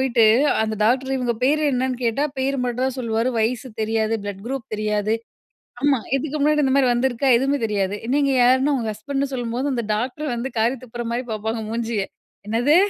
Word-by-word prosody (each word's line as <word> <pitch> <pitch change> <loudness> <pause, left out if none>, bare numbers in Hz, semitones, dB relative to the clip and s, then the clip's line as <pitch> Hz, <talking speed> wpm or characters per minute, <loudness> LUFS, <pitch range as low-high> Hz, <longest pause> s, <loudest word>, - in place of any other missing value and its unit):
போயிட்டு 230 - +6 0.4
அந்த 220 0 -1
டாக்டர் 260 +4 +2
இவுங்க 245 -2 0
பேரு 300 +4 +3
என்னன்னு 255 0 0
கேட்டா, 235 +5 +1
பேரு 270 +1 0
மட்டும் 245 +1 -1
தான் 265 0 -2
சொல்லுவாரு. 230 +1 0
வயசு 245 +4 0
தெரியாது, 220 0 0
ப்ளட் 200 -1 -6
குரூப் 265 -3 -4
தெரியாது, 210 0 0 0.7
ஆமா, 285 -1 +3 0.2
இதுக்கு 300 +2 -2
முன்னாடி 300 +1 +3
இந்த 265 -1 +2
மாதிரி 270 -2 +4
வந்திருக்கா? 255 +2 0
எதுவுமே 275 +3 +1
தெரியாது. 200 -2 -1 0.2
நீங்க 280 -1 +2
யாரு? 255 +2 +6
ன்னா 290 +2 +2
"இவுங்க 230 -4 -2
ஹஸ்பண்டு"ன்னு 275 +5 -2
சொல்லும்போது, 245 +2 -2
அந்த 235 -2 -1
டாக்டர் 255 +5 -3
வந்து 240 +3 -3
காரி 235 +4 +2
துப்புற 240 0 -6
மாரி 240 +2 -1
பார்ப்பாங்க 220 +1 -2
மூஞ்சிய. 230 -2 -1 0.4
"என்னது?" 245 +8 +3
245 Hz, 180 wpm, -22 LUFS, 225-270 Hz, 0.7 s, போயிட்டு